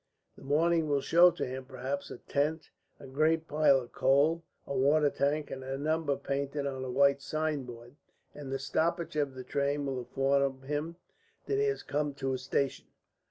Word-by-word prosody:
The - - -16
morning 160 +3 +2
will 140 -1 +2
show 175 +5 +6
to - - -3
him, 130 +1 -6
perhaps, 135 +2 -4
a - - -7
tent, 150 +5 -2 0.3
a - - -11
great 155 +4 +1
pile 150 -2 +4
of 120 - -12
coal, 140 +5 +3 0.2
a 140 - -4
water 145 +2 +3
tank, 145 +2 -1
and 130 - -6
a 135 +1 -4
number 155 0 0
painted 140 +1 -3
on 135 -2 -3
a 130 - -4
white 140 +2 +3
signboard, 135 -6 -4 0.4
and 140 -2 -8
the 135 - 0
stoppage 160 +5 -1
of 145 -3 -1
the 130 - -7
train 140 +2 -1
will 135 -2 -2
inform 135 +1 0
him 150 +4 -3 0.5
that 410 - 0
he 425 - +3
has 420 0 -1
come 145 -1 -2
to 135 -1 -2
a 130 - -2
station. 135 +1 -1
140 Hz, 185 wpm, -30 LUFS, 135-155 Hz, 0.5 s, show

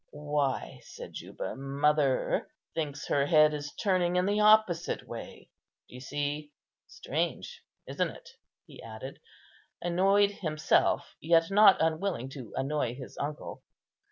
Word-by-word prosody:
"Why," 145 - -2
said - - -11
Juba, - - -6
"mother 140 0 +1 0.3
thinks 150 -3 -4
her 140 0 +2
head 155 -1 +5
is 145 -1 -5
turning 185 -4 +1
in 180 0 +2
the 205 +2 +1
opposite 210 -5 +3
way. - - -9 0.4
D'you 125 - -11
see? 145 +2 -4 0.3
Strange, - - -4 0.3
isn't - - -1
it?" - - -13 0.4
he - - -13
added, 115 +4 -9 0.6
annoyed 195 +4 +3
himself 155 -6 0
yet 165 +2 +3
not 205 -1 +7
unwilling 160 -5 -1
to 130 -4 -9
annoy 135 -3 -1
his 130 -1 -10
uncle. 145 +1 -5
150 Hz, 125 wpm, -29 LUFS, 140-175 Hz, 0.6 s, not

